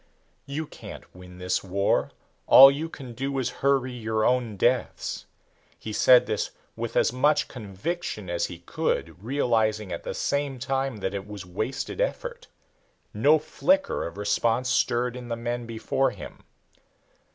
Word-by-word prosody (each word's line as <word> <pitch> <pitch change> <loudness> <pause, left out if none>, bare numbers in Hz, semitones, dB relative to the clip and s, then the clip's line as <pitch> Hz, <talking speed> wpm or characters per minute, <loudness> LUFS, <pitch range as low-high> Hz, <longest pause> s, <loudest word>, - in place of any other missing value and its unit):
"You 150 +3 -3
can't - - -11
win 90 0 -13
this 90 0 -1
war 100 +1 +1 0.4
all 135 +1 +10
you 155 +4 -4
can 130 -6 -9
do 135 +3 -3
is 130 -3 -1
hurry 135 -2 +2
your 110 -2 -1
own 120 -5 +1
deaths." 120 +4 0 0.5
He 110 - -7
said 125 +3 +6
this - - -1 0.3
with - - -5
as - - +3
much 145 +3 +2
conviction 110 - -5
as 85 0 -1
he 90 - -8
could, 85 +1 -3
realizing 110 -6 0
at 85 - -4
the - - -5
same 140 -2 -1
time 135 -1 -2
that 95 - -2
it 100 0 -5
was 105 -3 -8
wasted 110 - -3
effort. - - -3 0.7
No 140 +9 +5
flicker 280 - 0
of 85 - -10
response 115 +4 +1
stirred 120 0 +1
in 125 -1 -8
the 115 - -2
men 120 0 -3
before 115 +4 0
him. - - -11
120 Hz, 150 wpm, -26 LUFS, 105-135 Hz, 0.7 s, all